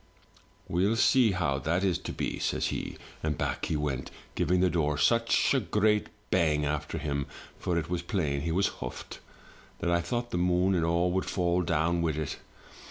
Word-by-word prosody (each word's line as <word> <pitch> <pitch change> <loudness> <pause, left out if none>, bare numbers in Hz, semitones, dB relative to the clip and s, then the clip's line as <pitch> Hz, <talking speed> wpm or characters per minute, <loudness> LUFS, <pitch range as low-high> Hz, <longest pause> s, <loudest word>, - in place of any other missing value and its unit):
" - - -30
'We'll 95 +6 +2
see 120 -2 +4
how 85 -7 0
that 85 +6 0
is 90 -3 +1
to - - -6
be,' - - -3
says - - 0
he; - - -4 0.2
and 75 -2 -1
back - - -2
he 80 - -1
went, 70 -3 -2 0.2
giving 90 +1 +1
the 90 - +4
door 75 -3 +1
such 115 - +3
a 135 - +3
great 105 -1 +2 0.2
bang 75 -5 +2
after 75 0 -2
him 70 -1 -2 0.3
(for 85 - -1
it 80 -2 -1
was 90 0 -2
plain 75 -6 -1
he 80 - -2
was 95 +4 +2
huffed) 60 - -6 0.6
that 85 - -1
I 85 0 +3
thought 120 +7 -3
the 90 - -1
moon 90 +2 +2
and 85 -3 +1
all 85 +2 +2
would 95 +1 0
fall 90 -1 +1
down 85 0 +1
with 80 -3 0
it. 75 - -3
85 Hz, 195 wpm, -29 LUFS, 75-95 Hz, 0.6 s, see